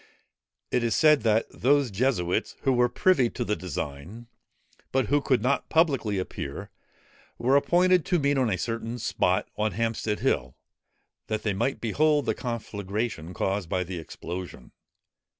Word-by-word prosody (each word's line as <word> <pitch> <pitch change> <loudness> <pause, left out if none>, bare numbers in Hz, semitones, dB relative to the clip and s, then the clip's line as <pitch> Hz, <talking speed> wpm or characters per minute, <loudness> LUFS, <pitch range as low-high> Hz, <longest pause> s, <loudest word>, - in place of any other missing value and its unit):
It 125 - +1
is 115 - +1
said 150 -2 +5
that 110 0 +2
those 140 -2 +2
Jesuits 95 -5 0
who 135 - +3
were 125 0 +3
privy 130 -1 +3
to 120 - -4
the 105 - 0
design, 85 +4 -6 0.7
but 130 -5 +1
who 145 0 +3
could 130 -5 +1
not 140 +2 0
publicly 135 - +2
appear, 90 -6 -5 0.7
were 130 +3 +2
appointed 180 +4 +4
to 180 - +2
meet 140 -2 +1
on 130 -4 +2
a 95 - 0
certain 115 +4 -3
spot, 95 -5 0
on 105 -2 +1
Hampstead 115 0 -1
Hill, - - 0 0.7
that 110 -1 -2
they 105 - 0
might 130 +8 -1
behold 150 +5 +2
the - - +1
conflagration 105 -6 -4
caused 95 -3 -1
by 90 +1 0
the 90 -1 -6
explosion. 85 -3 -8
115 Hz, 150 wpm, -26 LUFS, 95-135 Hz, 0.7 s, said